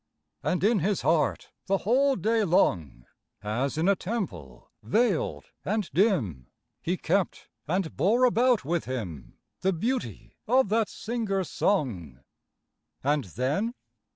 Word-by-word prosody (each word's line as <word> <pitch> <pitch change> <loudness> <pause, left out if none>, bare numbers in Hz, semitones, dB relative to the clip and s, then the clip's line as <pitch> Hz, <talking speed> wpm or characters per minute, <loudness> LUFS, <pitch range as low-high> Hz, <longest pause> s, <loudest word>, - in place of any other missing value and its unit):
And 180 - -1
in 215 0 +4
his 190 -3 0
heart 155 0 +1 0.2
the 195 0 +3
whole 265 +7 +2
day 220 +4 +1
long, 80 - +1 0.4
As 120 +8 -1
in 165 +3 +1
a 200 - +5
temple 175 - -5
veiled 155 - 0
and 210 -1 -1
dim, 120 - +1 0.3
He 180 +2 -1
kept 185 +3 -1 0.2
and 180 +1 -1
bore 230 +7 +3
about 245 - +3
with 170 +2 -1
him 95 - -6 0.2
The 190 +1 +1
beauty 160 - -3
of 255 -2 +3
that 220 0 +2
singer's 210 -6 -2
song. 95 - -1 0.8
And 145 -1 +1
then? 140 - -1
180 Hz, 125 wpm, -27 LUFS, -, 0.8 s, a